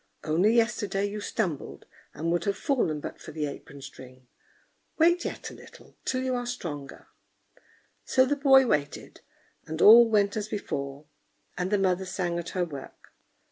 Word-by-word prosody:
only 180 Hz, +9 st, +2 dB
yesterday 210 Hz, -4 st, +1 dB
you 205 Hz, +1 st, -4 dB
stumbled, 165 Hz, -7 st, -3 dB, 0.3 s
and 165 Hz, +3 st, -2 dB
would 170 Hz, 0 st, 0 dB
have 200 Hz, 0 st, 0 dB
fallen 235 Hz, -, 0 dB
but -, -, -8 dB
for -, -, -9 dB
the 155 Hz, -1 st, -3 dB
apron 140 Hz, -1 st, -9 dB
string. 130 Hz, -2 st, -12 dB, 0.7 s
Wait 345 Hz, +2 st, +4 dB
yet -, -, -5 dB
a -, -, -11 dB
little, -, -, -16 dB
till 255 Hz, 0 st, -1 dB
you 260 Hz, 0 st, -1 dB
are 245 Hz, -1 st, -2 dB
stronger." 150 Hz, -, -6 dB, 1.0 s
So 260 Hz, -, +3 dB
the 290 Hz, +2 st, 0 dB
boy 270 Hz, -2 st, +6 dB
waited, 145 Hz, -, -2 dB, 0.5 s
and 160 Hz, +1 st, -5 dB
all 230 Hz, +5 st, +9 dB
went 205 Hz, -2 st, +2 dB
as 215 Hz, -1 st, -3 dB
before; 140 Hz, -8 st, -5 dB, 0.5 s
and 180 Hz, +1 st, -2 dB
the 205 Hz, -, +2 dB
mother 190 Hz, -1 st, +1 dB
sang 175 Hz, -2 st, -2 dB
at 170 Hz, -, -6 dB
her 180 Hz, -, +2 dB
work. 140 Hz, -5 st, -11 dB
190 Hz, 165 wpm, -27 LUFS, 155-230 Hz, 1.0 s, all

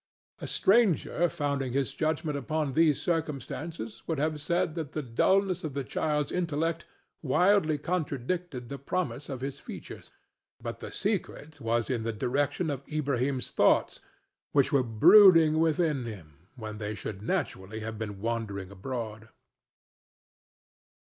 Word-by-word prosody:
A -, -, -6 dB
stranger 190 Hz, -5 st, +3 dB
founding 140 Hz, -5 st, -2 dB
his 135 Hz, 0 st, 0 dB
judgment 155 Hz, -1 st, -1 dB
upon 150 Hz, 0 st, -2 dB
these 155 Hz, -1 st, +4 dB
circumstances 150 Hz, -6 st, -3 dB
would 160 Hz, -, -1 dB
have 150 Hz, +1 st, -1 dB
said 170 Hz, +2 st, 0 dB
that 155 Hz, -4 st, -5 dB
the 155 Hz, -, -2 dB
dulness 185 Hz, +10 st, +2 dB
of 150 Hz, -4 st, -4 dB
the 140 Hz, -, -1 dB
child's 150 Hz, +2 st, -1 dB
intellect 165 Hz, -1 st, -1 dB, 0.4 s
widely 170 Hz, +1 st, +3 dB
contradicted 150 Hz, -3 st, -3 dB
the 140 Hz, +1 st, -6 dB
promise 140 Hz, -2 st, -3 dB
of 130 Hz, -3 st, -5 dB
his 135 Hz, 0 st, -4 dB
features, -, -, -9 dB, 0.5 s
but -, -, -6 dB
the -, -, -7 dB
secret 145 Hz, -1 st, -3 dB
was 115 Hz, 0 st, 0 dB
in 125 Hz, -4 st, -1 dB
the 115 Hz, 0 st, -2 dB
direction 145 Hz, +8 st, 0 dB
of 135 Hz, -1 st, -5 dB
Ilbrahim's 140 Hz, -3 st, -1 dB
thoughts, -, -, +3 dB, 0.5 s
which 140 Hz, 0 st, +3 dB
were 140 Hz, -3 st, +4 dB
brooding 160 Hz, -, +7 dB
within 160 Hz, -5 st, +1 dB
him 85 Hz, -7 st, -10 dB
when 110 Hz, -3 st, -7 dB
they 105 Hz, 0 st, -3 dB
should 100 Hz, -1 st, -6 dB
naturally 110 Hz, -, -3 dB
have 110 Hz, 0 st, -5 dB
been 105 Hz, -3 st, -5 dB
wandering 105 Hz, -4 st, -3 dB
abroad. 110 Hz, +1 st, -6 dB
140 Hz, 135 wpm, -29 LUFS, 115-160 Hz, 0.5 s, brooding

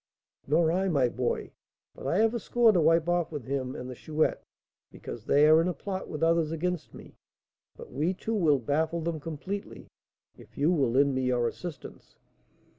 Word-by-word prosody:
"Nor 160 Hz, +3 st, +3 dB
I, 190 Hz, +2 st, 0 dB
my 135 Hz, -7 st, +2 dB
boy; 125 Hz, 0 st, -2 dB, 0.4 s
but -, -, -8 dB
I 175 Hz, -, +1 dB
have 225 Hz, +2 st, +3 dB
a 235 Hz, -, -2 dB
score 235 Hz, +1 st, +3 dB
to 180 Hz, -5 st, +2 dB
wipe 165 Hz, +1 st, +3 dB
off 175 Hz, -1 st, 0 dB
with 145 Hz, -6 st, -6 dB
him 130 Hz, -1 st, -3 dB
and 125 Hz, -, -6 dB
the 130 Hz, -, -6 dB
Chouette, 155 Hz, +5 st, -1 dB, 0.5 s
because -, -, -9 dB
they 145 Hz, +2 st, +5 dB
are 155 Hz, +1 st, +6 dB
in 170 Hz, -, 0 dB
a 180 Hz, -, -2 dB
plot 190 Hz, -2 st, -5 dB
with 155 Hz, +1 st, -4 dB
others 165 Hz, -1 st, +2 dB
against 170 Hz, 0 st, -3 dB
me; -, -, -13 dB, 0.6 s
but -, -, -11 dB
we 160 Hz, +8 st, 0 dB
two 225 Hz, +4 st, -4 dB
will 160 Hz, -9 st, +3 dB
baffle 155 Hz, +6 st, -1 dB
them 165 Hz, -1 st, -3 dB
completely, 165 Hz, +7 st, -6 dB, 0.5 s
if -, -, -17 dB
you 150 Hz, +5 st, +2 dB
will 140 Hz, -8 st, +2 dB
lend 140 Hz, +3 st, +3 dB
me 130 Hz, -, -1 dB
your 125 Hz, -2 st, +1 dB
assistance." 155 Hz, +4 st, -9 dB
160 Hz, 190 wpm, -28 LUFS, 140-175 Hz, 0.6 s, are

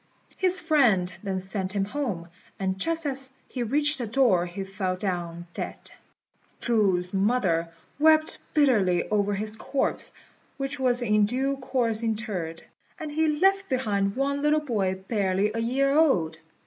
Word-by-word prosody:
His 370 Hz, 0 st, +1 dB
friend 240 Hz, -, +3 dB
then 195 Hz, -2 st, -2 dB
sent 190 Hz, +1 st, -3 dB
him 195 Hz, -1 st, +1 dB
home; 205 Hz, -8 st, -4 dB, 0.3 s
and 190 Hz, -1 st, -2 dB
just 330 Hz, +3 st, 0 dB
as 270 Hz, -1 st, 0 dB, 0.2 s
he 255 Hz, -, -5 dB
reached 290 Hz, +5 st, +2 dB
the 240 Hz, -, -3 dB
door 210 Hz, -7 st, +3 dB
he 180 Hz, +3 st, -5 dB
fell 190 Hz, -1 st, -3 dB
down 175 Hz, -3 st, -4 dB
dead. -, -, -6 dB, 0.7 s
Chu's 195 Hz, -6 st, +1 dB
mother 190 Hz, -5 st, +1 dB, 0.3 s
wept 310 Hz, 0 st, +4 dB, 0.2 s
bitterly 210 Hz, -, +3 dB
over 205 Hz, -1 st, +1 dB
his 215 Hz, +2 st, -3 dB
corpse, 265 Hz, +5 st, 0 dB, 0.5 s
which 275 Hz, 0 st, -3 dB
was 250 Hz, -2 st, +2 dB
in 210 Hz, -2 st, +3 dB
due 265 Hz, +4 st, 0 dB
course 240 Hz, -4 st, 0 dB
interred; 210 Hz, -8 st, -3 dB, 0.4 s
and 310 Hz, -3 st, -5 dB
he 315 Hz, +2 st, +1 dB
left 390 Hz, +1 st, +3 dB
behind 205 Hz, -7 st, 0 dB
one 280 Hz, +1 st, 0 dB
little 300 Hz, +1 st, +3 dB
boy 205 Hz, -10 st, -1 dB
barely 200 Hz, -1 st, +1 dB
a 225 Hz, -, -2 dB
year 270 Hz, +4 st, +1 dB
old. 175 Hz, -, +2 dB
225 Hz, 150 wpm, -26 LUFS, 190-275 Hz, 0.7 s, wept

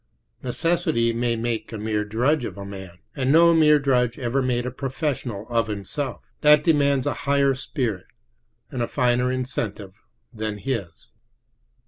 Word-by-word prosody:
Necessity 155 Hz, -4 st, 0 dB
may 120 Hz, 0 st, 0 dB
make 115 Hz, 0 st, -3 dB
a 110 Hz, -, -5 dB
mere 105 Hz, 0 st, -1 dB
drudge 125 Hz, +8 st, +1 dB
of 115 Hz, -, -5 dB
a 100 Hz, -, -7 dB
man, 95 Hz, -3 st, -9 dB, 0.2 s
and 130 Hz, 0 st, +1 dB
no 170 Hz, +2 st, +6 dB
mere 155 Hz, -2 st, +6 dB
drudge 125 Hz, -4 st, +1 dB
ever 130 Hz, +1 st, 0 dB
made 125 Hz, -1 st, 0 dB
a 125 Hz, -, -3 dB
professional 130 Hz, -5 st, -3 dB
of 115 Hz, -2 st, 0 dB
himself; 110 Hz, +6 st, -4 dB, 0.2 s
that 150 Hz, -1 st, +6 dB
demands 140 Hz, -4 st, +3 dB
a 145 Hz, -, 0 dB, 0.2 s
higher 140 Hz, -1 st, +4 dB
spirit 125 Hz, -, -3 dB, 0.6 s
and 125 Hz, -, -3 dB
a 120 Hz, -, 0 dB
finer 125 Hz, 0 st, +1 dB
incentive 115 Hz, -6 st, -4 dB, 0.4 s
than 110 Hz, -2 st, -4 dB
his. 100 Hz, -8 st, -5 dB
125 Hz, 150 wpm, -24 LUFS, 110-140 Hz, 0.6 s, no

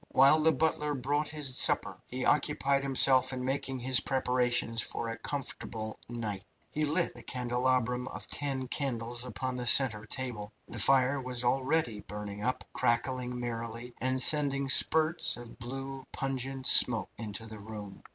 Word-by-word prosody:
While 135 Hz, +4 st, +6 dB
the 160 Hz, +1 st, +4 dB
butler 150 Hz, 0 st, 0 dB
brought 145 Hz, +3 st, -1 dB
his 145 Hz, -4 st, -2 dB
supper -, -, +2 dB
he 130 Hz, +1 st, -4 dB
occupied 140 Hz, -1 st, +2 dB
himself 130 Hz, -1 st, +4 dB
in 125 Hz, -1 st, -4 dB
making 135 Hz, 0 st, -2 dB
his 130 Hz, 0 st, +3 dB
preparations 125 Hz, -3 st, 0 dB
for 115 Hz, -, -4 dB
a 115 Hz, -, -5 dB
comfortable 115 Hz, -5 st, -5 dB
night. 110 Hz, -5 st, -4 dB, 0.3 s
He 155 Hz, 0 st, 0 dB
lit 160 Hz, +4 st, +1 dB
the -, -, -11 dB
candelabrum 125 Hz, 0 st, -1 dB
of -, -, -7 dB
ten 135 Hz, -2 st, -3 dB
candles 120 Hz, -3 st, -2 dB
upon 125 Hz, +1 st, -4 dB
the 125 Hz, -1 st, -4 dB
centre 115 Hz, -5 st, +4 dB
table. 110 Hz, -5 st, -4 dB
The 115 Hz, -, -6 dB
fire 135 Hz, +4 st, +4 dB
was 125 Hz, -1 st, -1 dB
already 130 Hz, -2 st, 0 dB
burning 105 Hz, +1 st, -7 dB
up, 125 Hz, +2 st, -1 dB
crackling 125 Hz, +1 st, 0 dB
merrily, 115 Hz, 0 st, -5 dB
and 130 Hz, +1 st, +1 dB
sending 140 Hz, -1 st, +3 dB
spurts 160 Hz, +2 st, +3 dB
of 120 Hz, -1 st, -12 dB
blue, 135 Hz, +2 st, -6 dB
pungent 135 Hz, 0 st, -4 dB
smoke 115 Hz, -7 st, +4 dB
into 110 Hz, 0 st, -6 dB
the 110 Hz, -1 st, -9 dB
room. 105 Hz, -2 st, -9 dB
125 Hz, 150 wpm, -30 LUFS, 115-135 Hz, 0.3 s, While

